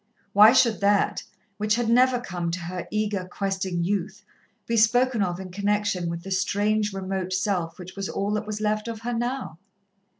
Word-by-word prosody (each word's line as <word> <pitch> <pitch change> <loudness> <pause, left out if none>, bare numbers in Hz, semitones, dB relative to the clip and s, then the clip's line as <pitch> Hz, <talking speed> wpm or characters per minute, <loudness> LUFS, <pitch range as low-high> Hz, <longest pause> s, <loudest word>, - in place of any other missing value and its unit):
Why 210 +2 +8
should 235 -3 +3
that, 200 0 +2 0.4
which 215 +1 +1
had 240 -1 -1
never 250 +2 +4
come 175 -7 -4
to 170 +2 -3
her 180 +1 -5
eager, 210 -3 -1
questing 190 -3 -2
youth, 195 +2 -2 0.4
be 230 - -1
spoken 240 +1 +3
of 180 -2 -1
in 185 -1 -8
connection 200 -2 0
with 170 0 -5
the 195 - -8
strange, 205 +2 +1
remote 190 -1 -3
self 180 -3 -1
which 185 0 -10
was 195 -1 -4
all 200 +1 -2
that 210 0 -2
was 215 0 -4
left 215 +1 -1
of 225 -1 -5
her 240 +1 -3
now? 240 -8 -3
205 Hz, 185 wpm, -25 LUFS, 185-215 Hz, 0.4 s, Why